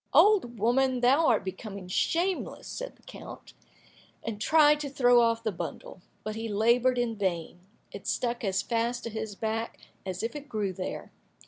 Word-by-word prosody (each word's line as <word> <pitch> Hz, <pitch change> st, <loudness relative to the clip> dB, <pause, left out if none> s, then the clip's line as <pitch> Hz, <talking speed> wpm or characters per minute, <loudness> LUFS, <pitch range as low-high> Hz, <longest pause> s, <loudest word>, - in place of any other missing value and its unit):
"Old 375 Hz, -, +5 dB
woman, 250 Hz, +4 st, +2 dB
thou 275 Hz, +6 st, +4 dB
art 225 Hz, -5 st, +3 dB
becoming 195 Hz, 0 st, -6 dB
shameless!" 345 Hz, -, -1 dB
said -, -, -6 dB
the -, -, -28 dB
count, -, -, -11 dB, 0.7 s
and 215 Hz, -2 st, -5 dB
tried 300 Hz, +2 st, +5 dB
to 290 Hz, -1 st, -4 dB
throw 245 Hz, -3 st, +5 dB
off 230 Hz, 0 st, +2 dB
the 220 Hz, -, 0 dB
bundle, 175 Hz, 0 st, -7 dB, 0.2 s
but 215 Hz, 0 st, -4 dB
he 225 Hz, 0 st, -4 dB
laboured 235 Hz, +4 st, +3 dB
in 240 Hz, -2 st, 0 dB
vain; 175 Hz, -4 st, -2 dB, 0.3 s
it 200 Hz, -, -9 dB
stuck 240 Hz, -1 st, -1 dB
as 195 Hz, -2 st, 0 dB
fast 235 Hz, +1 st, -1 dB
to 230 Hz, -, -5 dB
his 220 Hz, -1 st, -5 dB
back 225 Hz, +2 st, -3 dB, 0.3 s
as 185 Hz, 0 st, -4 dB
if 230 Hz, +5 st, -3 dB
it 290 Hz, -1 st, -8 dB
grew 210 Hz, -5 st, -1 dB
there. 185 Hz, 0 st, -5 dB
230 Hz, 175 wpm, -28 LUFS, 205-255 Hz, 0.7 s, Old